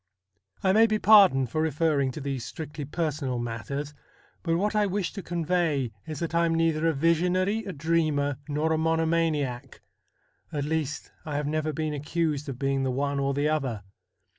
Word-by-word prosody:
I 190 -1 +4
may 225 +2 +6
be 215 -1 +1
pardoned 190 - +6
for 155 - 0
referring 155 -3 +1
to - - -6
these 135 -3 -3
strictly 150 +4 -6
personal 150 -4 -2
matters; 120 +5 -4 0.5
but 165 -1 0
what 210 +4 0
I 210 -1 +3
wish 195 -2 -2
to 195 - -5
convey 165 -7 0 0.2
is 155 -2 -5
that 170 -1 -3
I 170 0 +3
am 165 - +1
neither 165 -1 +2
a 165 - +2
visionary, 180 +7 +2
a 195 - -4
dreamer, 155 -3 0
nor 155 +2 +1
a 160 - +1
monomaniac. 160 -5 0 0.7
At 145 -2 -2
least, 155 -1 -2
I 150 -2 -5
have 145 0 -1
never 155 +1 -1
been 155 +1 -2
accused 150 0 -2
of 130 - -5
being 135 0 0
the 135 - 0
one 140 +2 -1
or 140 0 0
the 145 +1 +1
other. 130 -9 -1
155 Hz, 180 wpm, -27 LUFS, 140-165 Hz, 0.7 s, may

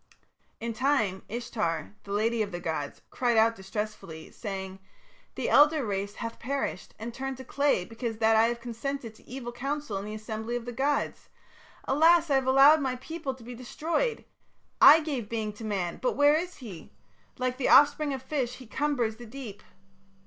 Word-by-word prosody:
"In 230 0 -3
time 220 -6 +1
Ishtar, 210 -9 -3
the 200 - -8
lady 220 +3 +1
of 205 -2 -2
the 175 - -4
gods, 160 -4 -4
cried 240 -2 +1
out 225 +1 +4
distressfully, 195 -5 -6
saying: 190 -3 -6 0.6
'The - - -2
elder 295 -2 +5
race 200 -1 -3
hath 230 -1 -6
perished 270 -7 -3
and 230 +2 -6
turned 270 +1 -4
to 260 - -8
clay 280 -8 +1
because 225 +1 -5
that 225 0 +4
I 220 +1 +6
have 235 0 -2
consented 240 +1 -5
to - - -20
evil 250 -2 -6
counsel 275 -2 -3
in 200 - -6
the 215 +1 -5
assembly 220 +2 -4
of 240 -1 -4
the 245 - -5
gods. 280 +4 -1 0.5
Alas! 325 +2 +4
I - - +5
have 265 -1 +2
allowed 275 +4 +7
my 260 -2 -1
people 280 +1 -5
to 255 - -15
be 245 +2 -8
destroyed. 320 - -2 0.6
I 320 +2 +10
gave 270 -9 -4
being 220 -2 -2
to 210 - -11
man, 195 -5 -2
but - - +1
where 290 0 +5
is 350 +3 -1
he? 205 - -10 0.5
Like 255 0 -1
the 265 - +1
offspring 290 +1 +6
of 265 -2 -4
fish 260 -3 -2
he 255 - -12
cumbers 245 -3 -1
the 240 0 -10
deep.' 230 -4 -8
240 Hz, 185 wpm, -28 LUFS, 215-275 Hz, 0.6 s, I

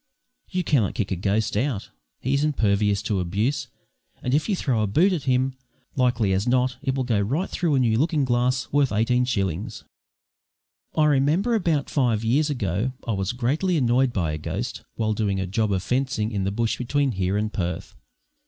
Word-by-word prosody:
You 180 0 -1
cannot 135 - +1
kick 100 -2 -2
a - - +1
ghost 100 +4 0
out; 115 -2 -1 0.3
he 135 - -1
is 140 +1 +2
impervious 105 -8 +1
to 100 -3 0
abuse, 100 +10 -1 0.6
and 125 - -1
if 150 +8 +1
you 200 - +2
throw 130 -10 0
a 105 - +1
boot 175 - +3
at 155 -7 -3
him, 130 0 +1 0.4
likely 125 -6 +2
as 95 +5 0
not 125 0 +2
it 135 -2 -1
will 135 - 0
go 115 -5 +1
right 140 - -1
through 165 -5 0
a - - +3
new 115 -3 +2
looking 150 -1 +2
glass 125 0 +1
worth 145 -2 +2
eighteen 125 +4 +2
shillings. 100 -2 -2 1.1
I 155 - +5
remember, 150 - +2
about 170 -10 +1
five 120 -6 +1
years 140 +7 +2
ago, 110 - -1
I - - 0
was 95 -1 -1
greatly 145 +9 0
annoyed 125 -1 +2
by 85 -8 -1
a 75 - -4
ghost, - - -4
while 110 -1 0
doing 105 -2 -1
a 95 - -1
job 105 +3 0
of 95 -2 0
fencing 125 -4 -1
in 100 -3 -1
the 100 - 0
bush 115 +2 -1
between 140 +2 +1
here 95 -1 -1
and 105 +1 -2
Perth. 85 -3 -3
120 Hz, 195 wpm, -24 LUFS, 105-140 Hz, 1.1 s, I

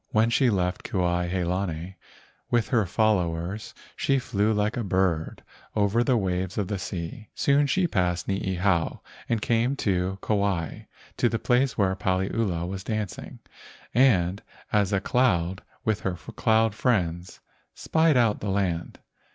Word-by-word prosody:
When 110 +2 +2
she 130 +1 +3
left 90 -3 0
Kuai 90 -2 0
he 90 0 -1
lani 90 0 -3 0.5
with 120 -2 +1
her 110 -6 +2
followers 95 -1 0 0.2
she 135 - +1
flew 105 -4 0
like 105 0 0
a 120 - -2
bird 95 -4 0 0.3
over 105 +3 +2
the 125 -1 +2
waves 95 -2 -2
of 100 -3 -1
the 100 -2 -2
sea. 90 +4 -6
Soon 140 +1 +3
she 185 +6 +2
passed 90 - 0
Niihau 95 -2 0 0.3
and 115 -2 0
came 120 +3 +1
to 95 -5 -1
Kauai 100 -7 -1 0.3
to 120 - +3
the 115 - -1
place 125 +1 +1
where 95 -2 +2
Paliula 95 -1 -1
was 95 +1 -5
dancing, 110 -3 -5 0.5
and 100 -7 +3 0.3
as 105 -2 +2
a 100 - +2
cloud 95 -7 +1 0.2
with 110 -2 +1
her 90 -2 -2
cloud 110 +6 +1
friends 90 -7 -1 0.4
spied 160 -3 +2
out 115 -4 +3
the 100 - -3
land. 95 -4 -1
100 Hz, 145 wpm, -26 LUFS, 90-115 Hz, 0.5 s, she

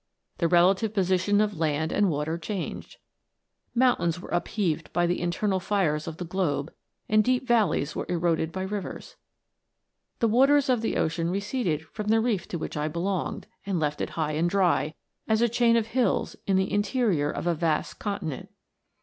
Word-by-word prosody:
The 170 - +3
relative 190 +5 +3
position 190 +1 +2
of 205 -5 -1
land 155 0 0
and 205 -2 +2
water 150 +1 -1
changed. 190 +1 -5 0.8
Mountains 180 -10 +2
were - - -10
upheaved 175 -4 -1
by 175 +1 +2
the 175 +1 0
internal 190 +3 0
fires 175 -6 0
of 165 -1 -5
the 180 - -5
globe, 165 -4 -1 0.3
and 215 0 +4
deep 255 +2 +1
valleys 210 - +2
were - - -3
eroded 165 -2 0
by 190 +1 -4
rivers. 200 +1 -5 1.0
The 230 - +2
waters 270 +5 +4
of 245 -3 +3
the 225 - -1
ocean 165 +1 0
receded 195 - -1
from 210 +6 -7
the 225 +1 +4
reef 220 -6 0
to 175 - -4
which 155 - -5
I 150 0 -1
belonged, 175 +3 -2 0.2
and 195 -3 -1
left 150 -1 -1
it - - -2
high 155 -2 0
and 160 +3 +1
dry, 175 -5 +1 0.3
as 220 0 +2
a 235 - +4
chain 235 0 +3
of 225 - +1
hills 230 -2 0
in 195 - +3
the 190 0 +1
interior 205 - +1
of - - -4
a 175 - +2
vast 160 -1 -1
continent. 195 -9 -4
185 Hz, 175 wpm, -26 LUFS, 165-215 Hz, 1.0 s, and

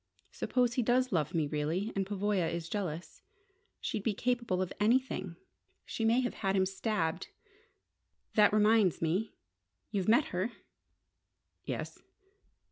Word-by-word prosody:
Suppose 245 -2 +1
he 250 - +1
does 250 +2 +2
love 165 -2 0
me 160 -2 +2
really, 155 +8 -1
and 195 -1 -1
Pavoya 200 -3 0
is 170 -1 -4
jealous? 175 -4 -4 0.6
She'd 215 - -3
be 210 0 -1
capable 235 -5 0
of 185 -1 -2
anything. 210 -5 +1 0.5
She 225 - -2
may 235 +3 +4
have 245 - -2
had 195 -2 -1
him 190 -1 +3
stabbed! 190 -4 -1 1.1
That 210 -1 +5
reminds 210 -3 +4
me: 180 +7 -1 0.6
you've 195 -1 0
met 240 +7 +4
her?" 190 +7 -1 1.1
"Yes." - - -5
205 Hz, 130 wpm, -32 LUFS, 180-225 Hz, 1.1 s, That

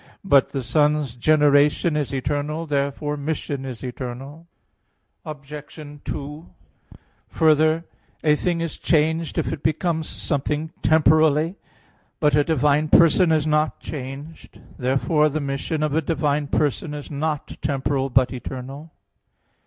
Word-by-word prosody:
But 140 -9 +4
the 135 -2 -4
Son's 145 +1 +1
generation 150 +3 +3
is 150 -3 -1
eternal. 145 +4 -2
Therefore 145 0 -1
mission 145 -2 -3
is 130 -3 -7
eternal. 130 +5 -7 0.8
Obj. 150 -1 -9 0.3
2: 150 +4 -6 0.8
Further, 155 +1 +3 0.4
a 150 -1 +4
thing 170 +2 -1
is 165 -2 -4
changed 160 +1 +1
if - - -1
it 140 - -6
becomes 160 0 -1
something 150 +1 -2
temporally. 155 +1 +4 0.7
But 150 -2 +3
a 145 - +4
divine 150 0 +2
person 165 +2 +5
is 155 -2 +2
not 150 -3 +1
changed. 140 +3 -8 0.2
Therefore 145 +4 +1
the 155 +2 -2
mission 140 +2 -2
of 150 -2 0
a 160 - +2
divine 150 -1 0
person 150 +2 -1
is 145 0 -8
not 150 0 -3
temporal, 135 -1 -1
but 130 0 +2
eternal. 135 +5 -7
150 Hz, 125 wpm, -22 LUFS, 140-155 Hz, 0.8 s, person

